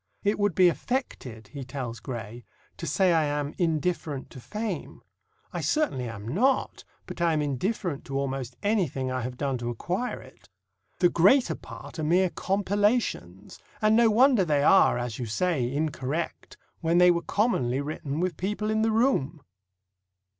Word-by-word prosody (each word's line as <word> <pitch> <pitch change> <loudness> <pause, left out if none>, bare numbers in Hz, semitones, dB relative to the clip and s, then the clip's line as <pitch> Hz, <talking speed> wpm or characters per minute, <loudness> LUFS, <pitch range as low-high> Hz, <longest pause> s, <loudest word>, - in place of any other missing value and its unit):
"It 205 +1 +1
would 205 -3 +1
be 185 -1 +6
affected," 150 - -3
he 140 -2 -7
tells 125 -3 -6
Gray, 120 -1 -7 0.3
"to 165 - -5
say 180 +4 +3
I 160 -2 +3
am 145 0 -2
indifferent 160 -4 -1
to - - -10
fame. 215 - -5 0.5
I - - -3
certainly 135 - 0
am 110 -2 -8
not, 240 - +1 0.2
but - - -8
I 170 -1 +3
am 155 - +1
indifferent 150 - -2
to 135 - -3
almost 135 -3 -3
anything 170 - 0
I 130 0 -2
have 125 +1 -5
done 135 -3 -1
to 120 0 -3
acquire 180 - -3
it. - - -17 0.5
The 175 - +4
greater 205 +12 +4
part - - -10
are - - -2
mere 175 +3 +3
compilations; 200 - -1 0.2
and 215 0 +4
no 230 0 +5
wonder 245 -1 +5
they 150 -4 +1
are, 190 -5 +5
as 120 -1 -4
you 120 - -3
say, 130 0 0
incorrect 150 +1 -3 0.2
when 165 +1 +1
they 180 0 +7
were 170 -1 0
commonly 135 - 0
written 145 0 -4
with 180 -2 -1
people 210 +3 -2
in 220 0 +1
the 225 - +2
room." 215 - +1
160 Hz, 165 wpm, -27 LUFS, 130-205 Hz, 0.5 s, they